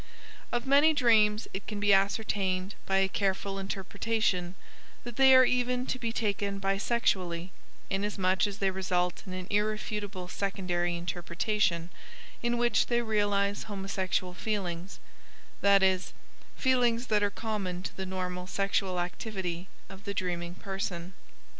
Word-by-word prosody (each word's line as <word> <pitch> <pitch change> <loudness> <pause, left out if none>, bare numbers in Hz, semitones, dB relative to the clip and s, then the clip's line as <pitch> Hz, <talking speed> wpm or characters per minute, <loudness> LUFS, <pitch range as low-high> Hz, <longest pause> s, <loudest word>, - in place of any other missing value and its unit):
Of 240 0 -1
many 285 +3 +5
dreams 220 -5 +4
it 190 - -5
can 210 -2 -4
be 205 0 +4
ascertained 195 -1 +1
by 195 - +2
a 195 0 +4
careful 195 0 -1
interpretation 195 -1 -1 0.5
that 240 -1 -7
they 265 0 +7
are 260 0 +8
even 250 0 +1
to 260 - -2
be 230 -2 -2
taken 200 -3 -1
bisexually, 195 -3 0 0.4
inasmuch 195 -1 +1
as 200 -1 -5
they 195 -2 +1
result 180 -2 -1
in 185 - -5
an 185 0 -5
irrefutable 210 -2 -1
secondary 180 -3 -1
interpretation 175 +1 -1 0.5
in 240 0 +1
which 240 -1 +3
they 240 0 +1
realize 205 -2 +1
homosexual 195 -2 -2
feelings 185 -3 -3 0.6
that 200 -1 +5
is, 190 -1 +2 0.4
feelings 245 -2 +2
that 215 -3 +2
are 205 - +2
common 200 -4 -3
to - - -6
the 190 -1 -4
normal 180 -1 -4
sexual 195 -1 0
activity 180 -1 -4 0.2
of 195 0 -12
the 200 - -3
dreaming 175 -2 -2
person. 185 -2 -4
195 Hz, 135 wpm, -30 LUFS, 185-215 Hz, 0.6 s, are